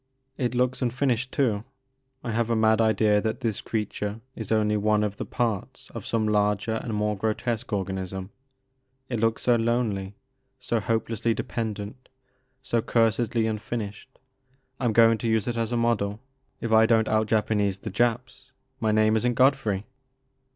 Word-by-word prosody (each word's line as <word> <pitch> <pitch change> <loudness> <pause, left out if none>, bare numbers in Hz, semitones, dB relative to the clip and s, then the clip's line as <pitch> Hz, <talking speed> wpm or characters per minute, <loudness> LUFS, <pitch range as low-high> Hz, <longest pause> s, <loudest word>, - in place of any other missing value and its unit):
It 125 -3 -1
looks 125 +1 +1
unfinished 125 0 0
too. 110 -7 +1 0.6
I 120 - -3
have 115 +1 0
a 115 - +2
mad 110 0 +3
idea 110 -2 +3
that 110 0 -2
this 110 -3 -1
creature 105 -1 -3 0.2
is 110 -2 -6
only 105 -1 +2
one 105 0 +2
of 105 -1 -2
the - - -5
parts 115 -5 -3
of - - -7
some 110 -2 0
larger 105 +1 +1
and 110 -1 -4
more 105 0 0
grotesque 110 +3 -2
organism, 95 -1 -3 0.4
— 130 0 -28
^it 120 - -1
looks 115 0 +1
so 120 - +4
lonely, 115 -4 -1 0.4
so 120 -2 -1
hopelessly 115 +1 -1
dependent, 110 +1 -5 0.5
so 115 - 0
cursedly 115 0 +1
unfinished. 110 +1 -4 0.7
I 130 - -2
'm 115 - +2
going 115 0 +5
to 115 - -2
use 110 -1 +1
it 120 - -1
as 115 0 -1
a 120 - +1
model. 110 -3 0 0.4
If 115 - -3
I 110 0 +6
don't 110 -1 +3
out 110 0 +2
Japanese 105 -3 +1
the - - -7
Japs 125 +2 -1 0.3
my 110 -3 +1
name 110 0 +3
is 110 - +1
n*t 120 -1 +1
Godfrey. 125 -7 +2
110 Hz, 165 wpm, -26 LUFS, 105-120 Hz, 0.7 s, I